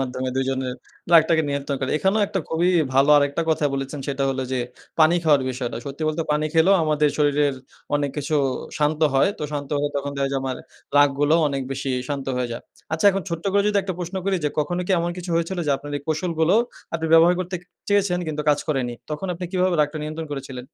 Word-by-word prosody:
মাধ্যমে 130 Hz, 0 st, -2 dB
দুজনের 130 Hz, -1 st, -1 dB, 0.4 s
রাগটাকে 160 Hz, 0 st, +6 dB
নিয়ন্ত্রণ 140 Hz, 0 st, -2 dB
করার। 130 Hz, -, -2 dB
এখানেও 195 Hz, +5 st, +2 dB
একটা 195 Hz, -2 st, -2 dB
খুবই 170 Hz, +2 st, +1 dB, 0.3 s
ভালো 135 Hz, +2 st, +5 dB
আরেকটা 145 Hz, +3 st, +2 dB
কথা 155 Hz, -1 st, +1 dB
বলেছেন, 135 Hz, +1 st, -4 dB
সেটা 140 Hz, 0 st, -1 dB
হলো 130 Hz, 0 st, -2 dB
যে 130 Hz, -, 0 dB, 0.4 s
পানি 160 Hz, +2 st, +6 dB
খাওয়ার 145 Hz, -4 st, +4 dB
বিষয়টা। 125 Hz, -2 st, -4 dB
সত্যি 140 Hz, +3 st, -6 dB
বলতে 155 Hz, +1 st, -1 dB
পানি 150 Hz, +1 st, 0 dB
খেলেও 165 Hz, +5 st, +5 dB
আমাদের 150 Hz, -1 st, +2 dB
শরীরের 145 Hz, -1 st, +2 dB, 0.4 s
অনেক 145 Hz, -1 st, 0 dB
কিছু 150 Hz, +1 st, -2 dB, 0.4 s
শান্ত 150 Hz, +1 st, +1 dB
হয়। 135 Hz, -, +4 dB
তো -, -, -6 dB
শান্ত 145 Hz, -1 st, -4 dB
হলে 145 Hz, -, 0 dB
তখন 140 Hz, 0 st, -2 dB
দেখা 140 Hz, 0 st, 0 dB
যায়, 135 Hz, -, 0 dB
আমার 130 Hz, -1 st, -3 dB, 0.4 s
রাগ 145 Hz, 0 st, +7 dB
গুলো 150 Hz, +2 st, +4 dB
অনেক 135 Hz, -1 st, -2 dB
বেশি 135 Hz, 0 st, -3 dB, 0.2 s
শান্ত 140 Hz, -2 st, -3 dB
হয়ে 125 Hz, -1 st, -1 dB
যায়। 115 Hz, -, -6 dB, 0.3 s
আচ্ছা, 160 Hz, +5 st, -1 dB
এখন 195 Hz, 0 st, -2 dB
ছোট্ট 170 Hz, -1 st, -4 dB
করে 200 Hz, 0 st, +4 dB
যদি 205 Hz, -, +2 dB
একটা 185 Hz, -1 st, -4 dB
প্রশ্ন 180 Hz, +2 st, -5 dB
করি 195 Hz, -1 st, +1 dB
যে, 150 Hz, -, +3 dB
কখনো 175 Hz, +4 st, 0 dB
কি -, -, -4 dB
এমন 170 Hz, +1 st, -1 dB
কিছু 180 Hz, 0 st, -6 dB
হয়েছিল, 170 Hz, +2 st, -1 dB
যে 145 Hz, -, +2 dB
আপনার 145 Hz, +1 st, -9 dB
এই 145 Hz, -, -7 dB
কৌশলগুলো 160 Hz, +2 st, +1 dB, 0.4 s
আপনি 160 Hz, -1 st, -1 dB
ব্যবহার 165 Hz, +2 st, +7 dB
করতে 185 Hz, +1 st, -4 dB
ক -, -, -23 dB, 0.3 s
চেয়েছেন 200 Hz, -3 st, +2 dB
কিন্তু 150 Hz, -1 st, -3 dB
কাজ 145 Hz, -, +4 dB
করেনি? 130 Hz, -5 st, 0 dB, 0.2 s
তখন 150 Hz, +6 st, -3 dB
আপনি 180 Hz, -, -6 dB
কিভাবে 185 Hz, -2 st, +2 dB
রাগটা 150 Hz, +1 st, 0 dB
নিয়ন্ত্রণ 155 Hz, +1 st, -5 dB
করেছিলেন? 135 Hz, -2 st, -6 dB
150 Hz, 215 wpm, -23 LUFS, 140-170 Hz, 0.4 s, রাগ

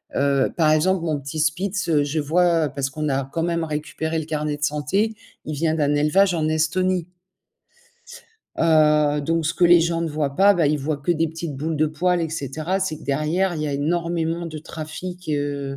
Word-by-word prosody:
heu, 140 Hz, -1 st, +2 dB
par 155 Hz, -3 st, +3 dB
exemple, 170 Hz, +3 st, +2 dB
mon 155 Hz, -3 st, -1 dB
petit 140 Hz, +3 st, -6 dB
spitz, 175 Hz, +5 st, -1 dB
je 145 Hz, +2 st, -2 dB
vois 165 Hz, +1 st, +2 dB
parce 135 Hz, 0 st, -3 dB
qu'on 150 Hz, +2 st, -3 dB
a 135 Hz, -1 st, 0 dB
quand 165 Hz, +5 st, -3 dB
même 170 Hz, -1 st, -1 dB
récupéré 160 Hz, +1 st, -3 dB
le 160 Hz, -, -3 dB
carnet 150 Hz, -1 st, -2 dB
de 145 Hz, -, -7 dB
santé, 150 Hz, +10 st, 0 dB, 0.3 s
il 155 Hz, -, -4 dB
vient 160 Hz, +2 st, 0 dB
d'un 145 Hz, -2 st, +1 dB
élevage 180 Hz, +6 st, +3 dB
en 160 Hz, -2 st, 0 dB
Estonie 175 Hz, +3 st, 0 dB, 1.5 s
heu 150 Hz, -2 st, +3 dB
donc 165 Hz, +3 st, -1 dB
ce 165 Hz, -, -1 dB
que -, -, +2 dB
les 175 Hz, 0 st, +7 dB
gens 165 Hz, 0 st, 0 dB
ne 165 Hz, -, -1 dB
voient 150 Hz, -2 st, -2 dB
pas, 200 Hz, +1 st, +6 dB
bah, 170 Hz, -4 st, +2 dB
ils 150 Hz, +1 st, +1 dB
voient 145 Hz, +2 st, -2 dB
que 145 Hz, +5 st, 0 dB
des 165 Hz, 0 st, 0 dB
petites 160 Hz, -1 st, -6 dB
boules 155 Hz, +3 st, -2 dB
de 155 Hz, +1 st, +2 dB
poils 175 Hz, +3 st, 0 dB
et 165 Hz, -, -1 dB
cetera, 155 Hz, +5 st, -3 dB
c'est 185 Hz, -5 st, -2 dB
que -, -, -14 dB
derrière 155 Hz, +6 st, 0 dB
il 155 Hz, -, -3 dB
y -, -, -1 dB
a -, -, -2 dB
énormément 165 Hz, +3 st, -1 dB
de 155 Hz, -1 st, -7 dB
trafic, 165 Hz, +3 st, -8 dB
heu, 145 Hz, -2 st, -2 dB
155 Hz, 205 wpm, -22 LUFS, 150-170 Hz, 1.5 s, les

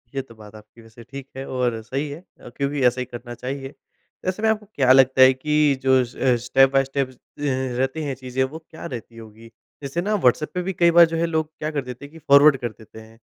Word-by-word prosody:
ये 135 Hz, -, -1 dB
तो 115 Hz, -3 st, -17 dB
बात 105 Hz, 0 st, -14 dB
आपकी 110 Hz, +2 st, -16 dB
वैसे 115 Hz, +1 st, -15 dB
ठीक 135 Hz, +3 st, -10 dB
है। 135 Hz, -, -5 dB
और 125 Hz, -3 st, -2 dB
सही 135 Hz, +6 st, -4 dB
है 145 Hz, +3 st, -8 dB, 0.2 s
अ, -, -, -12 dB
क्योंकि 140 Hz, +2 st, -3 dB
ऐसा 125 Hz, +1 st, 0 dB
ही -, -, -3 dB
करना 120 Hz, 0 st, -9 dB
चाहिए। 135 Hz, +3 st, -6 dB, 0.5 s
वैसे 185 Hz, +4 st, -3 dB
में 220 Hz, -, +3 dB
आपको 215 Hz, -1 st, -1 dB
क्या 130 Hz, -2 st, +3 dB
लगता 130 Hz, 0 st, +5 dB
है 130 Hz, 0 st, +8 dB
कि 150 Hz, +1 st, +1 dB
जो 130 Hz, 0 st, +4 dB
अ, 125 Hz, +1 st, 0 dB
स्टेप 135 Hz, +1 st, +4 dB
बाई 135 Hz, 0 st, +4 dB
स्टेपस 135 Hz, -1 st, -3 dB
अ, -, -, -31 dB, 0.6 s
रहती 135 Hz, +4 st, -1 dB
हैं 140 Hz, -3 st, -3 dB
चीज़ें, 130 Hz, +1 st, -2 dB
वो 150 Hz, +5 st, -5 dB
क्या 160 Hz, -, -10 dB
रहती 120 Hz, -5 st, -8 dB
होगी? 115 Hz, +1 st, -13 dB, 0.3 s
जैसे 140 Hz, +6 st, -3 dB
ना 210 Hz, +3 st, 0 dB
व्हाट्सएप 150 Hz, -, +1 dB
पे 180 Hz, -, -2 dB
भी 190 Hz, +1 st, -3 dB
कई 170 Hz, -1 st, +3 dB
बार 170 Hz, -, +10 dB
जो -, -, 0 dB
है 170 Hz, -, +1 dB
लोग 160 Hz, -1 st, -2 dB
क्या 155 Hz, 0 st, -3 dB
कर 145 Hz, -2 st, -2 dB
देते 125 Hz, +2 st, -8 dB
हैं 145 Hz, -, -14 dB
कि 165 Hz, -, -13 dB
फ़ॉरवर्ड 140 Hz, -1 st, +6 dB
कर 120 Hz, -2 st, -4 dB
देते 110 Hz, +1 st, -15 dB
हैं। 110 Hz, +1 st, -18 dB
135 Hz, 250 wpm, -22 LUFS, 120-150 Hz, 0.6 s, बार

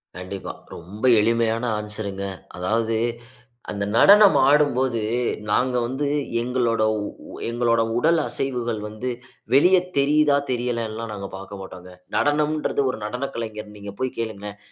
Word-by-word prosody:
கண்டிப்பா. 95 Hz, +1 st, -6 dB, 0.2 s
ரொம்ப 95 Hz, +7 st, -11 dB, 0.2 s
எளிமையான 115 Hz, +1 st, +1 dB, 0.2 s
ஆன்ஸருங்க. 105 Hz, -2 st, -4 dB, 0.3 s
அதாவது 110 Hz, +5 st, 0 dB, 0.8 s
அந்த 100 Hz, -1 st, -2 dB
நடனம் 200 Hz, -, +7 dB
ஆடும்போது, 130 Hz, -4 st, +3 dB, 0.5 s
நாங்க 125 Hz, +4 st, +2 dB
வந்து 135 Hz, +4 st, -2 dB, 0.4 s
எங்களோட 120 Hz, -2 st, +1 dB, 0.2 s
உ -, -, -3 dB, 0.4 s
எங்களோட 115 Hz, -1 st, +2 dB, 0.2 s
உடல் 165 Hz, +6 st, +3 dB
அசைவுகள் 120 Hz, -4 st, -2 dB
வந்து 110 Hz, +4 st, -5 dB, 0.4 s
வெளிய 180 Hz, +8 st, +6 dB, 0.2 s
தெரியிதா? 145 Hz, +1 st, +4 dB
தெரியலன்லாம் 115 Hz, -2 st, -2 dB
நாங்க 100 Hz, -1 st, -5 dB
பாக்க 100 Hz, +1 st, -8 dB
மாட்டோங்க. 90 Hz, -1 st, -10 dB, 0.2 s
நடனம்ன்றது 150 Hz, 0 st, +1 dB
ஒரு 120 Hz, -, -7 dB
நடன 125 Hz, +6 st, -3 dB
கலைஞர் 110 Hz, -2 st, -6 dB
நீங்க 100 Hz, -1 st, -8 dB
போய் 130 Hz, -1 st, -2 dB
கேளுங்களேன். 105 Hz, -3 st, -5 dB
115 Hz, 120 wpm, -23 LUFS, 105-130 Hz, 0.8 s, நடனம்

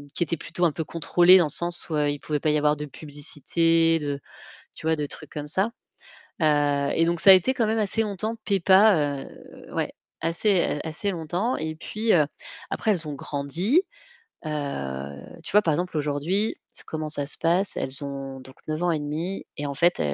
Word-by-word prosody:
qui -, -, +2 dB
étaient 165 Hz, 0 st, -2 dB
plutôt 175 Hz, +3 st, -2 dB
un 165 Hz, -, +3 dB
peu 160 Hz, -, -4 dB
contrôlées 175 Hz, +3 st, +5 dB
dans 175 Hz, -, +4 dB
le -, -, -8 dB
sens 175 Hz, +3 st, -2 dB
où 155 Hz, -, -1 dB
il 145 Hz, -1 st, 0 dB
pouvait 150 Hz, 0 st, -2 dB
pas 155 Hz, -, 0 dB
y 150 Hz, -, +3 dB
avoir 150 Hz, 0 st, +2 dB
de 150 Hz, 0 st, -5 dB
publicité, 165 Hz, +3 st, 0 dB
de, 145 Hz, -2 st, -3 dB, 0.6 s
tu -, -, -9 dB
vois, 160 Hz, 0 st, +2 dB
de 150 Hz, -1 st, -2 dB
trucs -, -, -11 dB
comme 150 Hz, -1 st, -5 dB
ça 190 Hz, +8 st, 0 dB, 0.7 s
et -, -, +2 dB, 0.6 s
heu, -, -, +6 dB
donc 170 Hz, 0 st, 0 dB
ça 195 Hz, -, +8 dB
a -, -, +13 dB
été 185 Hz, +8 st, +3 dB
quand 235 Hz, -4 st, +1 dB
même 220 Hz, +1 st, 0 dB
assez 215 Hz, +1 st, +1 dB
longtemps, 215 Hz, +1 st, -3 dB
Peppa, 190 Hz, -7 st, +4 dB, 0.5 s
ouais, -, -, -1 dB, 0.3 s
assez, 170 Hz, -1 st, +1 dB
assez 160 Hz, +5 st, -2 dB
longtemps 180 Hz, +7 st, -2 dB
et 155 Hz, 0 st, -4 dB
puis 215 Hz, +7 st, -1 dB
heu, 155 Hz, -4 st, +4 dB, 0.4 s
après, 220 Hz, -, 0 dB
elles 170 Hz, -5 st, -3 dB
ont 150 Hz, -, -4 dB
grandi, 155 Hz, -, 0 dB, 0.6 s
heu, -, -, -3 dB, 0.9 s
tu -, -, -8 dB
vois, 210 Hz, -, +6 dB
par 165 Hz, -6 st, +1 dB
exemple 175 Hz, +2 st, -2 dB
aujourd'hui, 150 Hz, +9 st, 0 dB, 0.3 s
comment 155 Hz, -1 st, -4 dB
ça 145 Hz, -2 st, -1 dB
se -, -, +1 dB
passe, 175 Hz, +4 st, +1 dB
elles 135 Hz, +2 st, +4 dB
ont 135 Hz, -1 st, -6 dB
donc 130 Hz, +1 st, -14 dB
9 155 Hz, +1 st, -3 dB
ans 175 Hz, -1 st, +2 dB
et 160 Hz, -, 0 dB
demi 160 Hz, +6 st, -4 dB
et 145 Hz, -, -3 dB
en 140 Hz, -, -4 dB
fait 175 Hz, +5 st, +2 dB
165 Hz, 195 wpm, -25 LUFS, 150-185 Hz, 0.9 s, a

